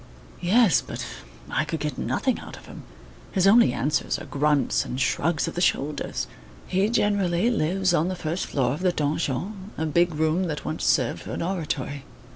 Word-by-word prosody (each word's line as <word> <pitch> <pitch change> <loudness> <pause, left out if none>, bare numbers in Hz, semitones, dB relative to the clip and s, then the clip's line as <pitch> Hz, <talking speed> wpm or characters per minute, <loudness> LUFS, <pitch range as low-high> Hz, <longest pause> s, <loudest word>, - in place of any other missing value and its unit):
"Yes, 200 +1 +4
but - - -6 0.5
I - - +1
could 160 +1 -4
get 150 0 -3
nothing 260 -3 -1
out - - -9
of - - -14
him. - - -10 0.5
His 190 -2 +2
only 215 - +6
answers 135 +5 0
are - - -8
grunts 145 0 +1
and 125 - -5
shrugs 155 +4 +1
of - - -4
the 175 - -2
shoulders. 150 -4 0 0.4
He 195 +3 +1
generally 205 -2 +2
lives 185 -2 +1
on 165 0 +2
the 185 - -2
first 170 +1 -3
floor 130 -3 0
of 150 - -5
the 185 -1 +3
donjon, 165 +6 -2
a 160 - -1
big 170 +2 +2
room 160 +4 +1
that 150 -3 -4
once 155 - -3
served 125 -4 +2
for - - -7
an - - -2
oratory. 150 -6 -3
165 Hz, 185 wpm, -25 LUFS, 150-190 Hz, 0.5 s, only